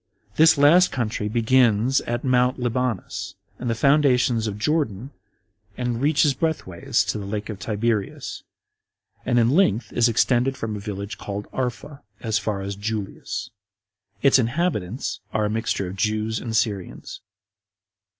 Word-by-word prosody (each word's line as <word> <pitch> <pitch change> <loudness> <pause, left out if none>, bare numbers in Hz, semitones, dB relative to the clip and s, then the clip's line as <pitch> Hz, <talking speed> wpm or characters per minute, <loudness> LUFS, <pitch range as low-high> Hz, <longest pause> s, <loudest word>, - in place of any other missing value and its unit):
This 160 0 +6
[last] 165 +6 +6
country 110 -4 -2
begins 120 +1 +3
at 120 0 -2
Mount 125 0 +2
Libanus, 125 -3 -2 0.2
and 125 - -3
the 115 - 0
fountains 125 -3 +3
of 105 -1 -4
Jordan, 130 -2 -1 0.7
and 120 -1 -2
reaches 145 0 +3
breadthways 130 - -1
to - - -1
the 100 - -6
lake 105 +1 -4
of 105 -3 -6
Tiberias; 110 -1 -2 0.9
and 120 - +2
in 120 0 +4
length 120 - +2
is 120 0 +3
extended 125 +3 +2
from 110 -3 -4
a - - -5
village 100 0 -6
called 100 0 -5
Arpha, 130 +3 -4 0.2
as 110 -2 0
far 105 -1 -3
as 100 +1 -4
Julias. 105 0 -4 0.7
Its 140 -1 +6
inhabitants 125 - -1
are 110 -1 +1
a 105 - -1
mixture 110 -3 -1
of 90 +2 -7
Jews 110 +2 0
and 115 -2 -4
Syrians. 100 -5 -2
115 Hz, 140 wpm, -23 LUFS, 105-130 Hz, 0.9 s, This